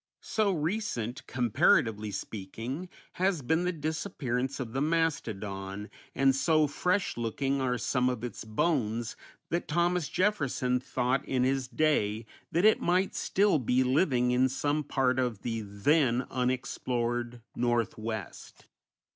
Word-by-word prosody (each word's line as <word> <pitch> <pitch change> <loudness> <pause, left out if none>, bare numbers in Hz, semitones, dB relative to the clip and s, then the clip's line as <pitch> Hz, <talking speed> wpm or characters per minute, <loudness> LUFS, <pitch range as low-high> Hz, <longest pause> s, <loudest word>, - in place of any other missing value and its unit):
So 215 -2 +1
recent, 155 - -2
comparatively 110 -3 +2
speaking, 115 - -5 0.3
has 185 -6 +2
been 160 +7 +1
the 180 - +1
disappearance 140 -5 -2
of 115 -4 -5
the 135 - -1
mastodon, 105 -11 -2 0.2
and 135 -1 +4
so 155 +3 +3
fresh 180 +5 0
looking 135 +4 -1
are 125 -1 +1
some 125 +1 +1
of 125 -2 -3
its 120 - -5
bones, 115 -1 0 0.4
that 170 +1 -1
Thomas 175 0 +1
Jefferson 140 -10 +1
thought 125 +1 0
in 130 -1 +1
his 130 0 +1
day 115 -8 +1 0.3
that 175 +4 +2
it 215 - +5
might 180 +2 +2
still 200 -5 +2
be 125 +1 +2
living 130 -2 +2
in 130 +1 +3
some 145 +3 0
part 130 -2 +1
of 120 -5 -1
the 115 -2 -2
then 120 +5 +2
unexplored 120 -1 -2
Northwest. 115 -4 -3
130 Hz, 130 wpm, -29 LUFS, 120-155 Hz, 0.4 s, it